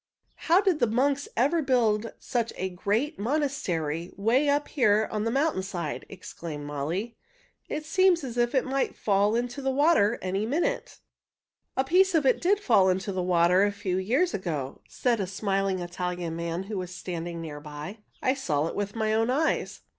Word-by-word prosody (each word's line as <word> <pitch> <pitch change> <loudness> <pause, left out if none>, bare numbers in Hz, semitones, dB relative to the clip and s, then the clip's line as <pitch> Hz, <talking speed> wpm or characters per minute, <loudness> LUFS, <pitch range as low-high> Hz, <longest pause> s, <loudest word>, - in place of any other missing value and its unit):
"How 350 +4 +6
did 380 -6 +1
the 240 - +3
monks 275 +5 +1
ever 290 +8 +3
build 230 -5 +1
such 235 -2 -2
a 190 - -2
great 215 - -1
monastery 190 - -1
'way 245 +8 +2
up 290 +1 +1
here 215 -6 +3
on 215 0 -1
the - - +1
mountain 275 -3 +1
side?" 175 -5 -5
exclaimed 165 -5 -8
Molly. 160 +11 -3 0.5
"It 305 0 -4
seems 370 -1 +3
as 245 -3 -5
if 240 +2 +1
it 260 - +2
might 270 +1 -1
fall 205 +1 +2
into 245 +3 -2
the 270 - 0
water 265 -6 +3
any 190 +2 -2
minute." 330 - -1 0.8
"A 265 - +3
piece 365 +6 +3
of 310 -3 +3
it 260 - +3
did 395 +3 +3
fall 195 - +4
into 190 +2 -1
the 185 -1 -2
water 180 +1 +4
a 205 - +2
few 200 -3 -2
years 260 - +1
ago," 155 -8 -4
said 240 -3 0
a 195 - -1
smiling 195 0 -1
Italian 175 -1 -4
man 170 +2 -3
who 200 0 -4
was 180 -1 -5
standing 175 -2 -5
near 155 -3 -6
by. 150 +8 -8 0.2
"I 260 - +3
saw 155 - -1
it 165 - -4
with 205 +1 -3
my 220 -1 0
own 225 +2 +2
eyes. 300 +5 0
215 Hz, 185 wpm, -27 LUFS, 180-270 Hz, 0.8 s, How